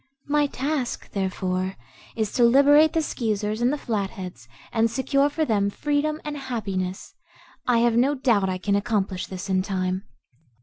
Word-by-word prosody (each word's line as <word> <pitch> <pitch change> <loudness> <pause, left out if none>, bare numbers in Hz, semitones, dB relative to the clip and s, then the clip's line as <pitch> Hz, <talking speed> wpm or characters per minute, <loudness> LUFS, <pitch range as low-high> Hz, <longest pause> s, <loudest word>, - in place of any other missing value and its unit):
My 295 0 +2
task, 275 -2 -3
therefore, 185 -1 -2 0.4
is 220 -3 -1
to 245 - +3
liberate 285 +5 +6
the 325 -1 +1
Skeezers 215 -5 -2
and 245 +2 +3
the 295 - -1
Flatheads 195 - -4 0.3
and 225 0 +3
secure 275 +4 +1
for 310 +2 -1
them 205 -5 +1
freedom 295 +6 -1
and 295 -1 -4
happiness. 195 -8 -4 0.5
I 235 -2 +4
have 235 -1 +3
no 265 +5 +3
doubt 230 -8 +2
I 185 - -1
can 200 +2 0
accomplish 200 -3 -1
this 185 +1 -6
in 190 -1 +2
time." 185 0 -2
225 Hz, 160 wpm, -24 LUFS, 195-275 Hz, 0.5 s, liberate